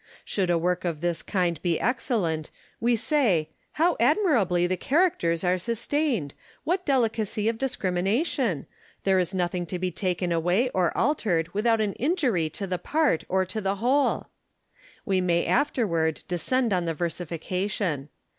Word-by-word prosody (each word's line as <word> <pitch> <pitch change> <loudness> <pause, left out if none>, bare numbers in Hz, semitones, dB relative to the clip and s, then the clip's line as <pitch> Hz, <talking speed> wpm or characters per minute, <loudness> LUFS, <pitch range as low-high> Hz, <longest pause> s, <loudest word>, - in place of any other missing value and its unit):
Should 190 -3 -1
a 175 - +3
work 180 +2 0
of 165 -4 -2
this 175 -1 -1
kind 175 -5 -1
be 170 -3 0
excellent, 210 - -1 0.3
we 235 +1 +2
say, 220 - +1
" - - -42
How 340 +2 +2
admirably 235 - +3
the 185 +1 0
characters 195 - +1
are 180 0 +2
sustained! 235 - -1 0.3
What 365 +3 -1
delicacy 225 -5 +1
of 225 0 0
discrimination! 205 - 0 0.4
There 190 -1 +3
is 185 +1 -1
nothing 175 -1 -1
to 180 - -3
be 185 0 -2
taken 180 0 -1
away 175 +9 +2
or 180 -7 +1
altered 180 - +1
without 225 +2 +2
an 205 -2 0
injury 250 - 0
to 195 +6 -5
the 180 -2 -2
part 300 - +1
or 190 0 +2
to 185 +4 -4
the 195 0 0
whole." 255 +7 +1 0.8
We 190 -4 +1
may 170 -1 +1
afterward 170 - +1
descend 220 +7 0
on 180 -2 0
the 165 -1 -2
versification. 175 -1 -2
190 Hz, 155 wpm, -26 LUFS, 175-240 Hz, 0.8 s, a